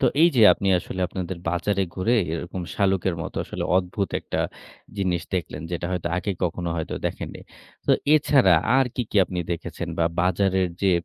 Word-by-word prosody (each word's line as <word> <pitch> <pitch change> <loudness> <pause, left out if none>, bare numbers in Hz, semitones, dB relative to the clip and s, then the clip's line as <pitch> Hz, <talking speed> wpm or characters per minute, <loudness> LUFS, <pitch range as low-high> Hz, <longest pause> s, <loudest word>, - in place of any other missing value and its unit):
তো - - +2 0.2
এই 170 - +8
যে 115 - +6
আপনি 100 - -2
আসলে 95 - -6
আপনাদের 90 -1 -5
বাজারে 95 +3 0
ঘুরে 110 +6 +1 0.2
এরকম 90 +2 -4
শালুকের 95 -2 +1
মতো - - -7
আসলে - - -4
অদ্ভুত 95 +2 -1
একটা - - -3 0.6
জিনিস 90 -3 0
দেখলেন। 85 -4 -3
যেটা 85 0 -2
হয়তো 85 -1 -2
আগে 100 +3 -2
কখনো 85 0 -2
হয়তো 80 - -3
দেখেননি। - - -5 0.5
তো - - +3 0.2
এছাড়া 135 -10 +5 0.2
আর 135 - +4
কি, 125 - 0
কি - - -2
আপনি 90 - -5
দেখেছেন 85 0 -5
বা 85 - +3 0.2
বাজারের 95 +1 +2
যেয়ে 95 -3 +3
95 Hz, 175 wpm, -24 LUFS, 85-100 Hz, 0.6 s, এই